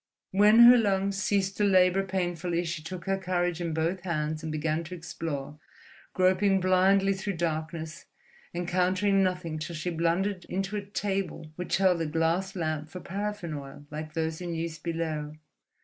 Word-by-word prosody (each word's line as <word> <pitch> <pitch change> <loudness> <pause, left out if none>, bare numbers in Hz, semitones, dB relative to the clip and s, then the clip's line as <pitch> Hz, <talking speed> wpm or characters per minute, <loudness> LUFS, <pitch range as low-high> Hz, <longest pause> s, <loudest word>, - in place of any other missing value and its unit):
When 210 +4 +6
her 240 +1 +10
lungs 195 -2 +1
ceased 195 -2 0
to 210 - +1
labour 190 -1 +4
painfully, 175 -2 -1
she 160 -1 -3
took 170 +2 -7
her 195 0 0
courage 175 -2 -1
in 170 -1 -2
both 160 +4 0
hands 155 -3 -2
and 160 -1 -4
began 155 +1 -1
to 180 +3 -7
explore, 150 -4 -5 0.6
groping 190 +1 +3
blindly 190 +2 +4
through 195 +1 -3
darkness, 160 -1 -3 0.5
encountering 185 +3 +1
nothing 180 -4 -1
till 165 +2 -5
she 165 +3 -3
blundered 175 +3 0
into 195 +2 -3
a 205 - -2
table 195 -5 -3
which 180 0 -1
held 185 -3 +3
a 165 - -1
glass 165 +5 0
lamp 155 -3 -2
for 180 - -7
paraffin 200 -2 -4
oil, 140 0 -8
like 155 +1 -6
those 160 0 -2
in 175 -1 -4
use 165 -1 -4
below. 155 -2 -3
175 Hz, 165 wpm, -28 LUFS, 160-195 Hz, 0.6 s, her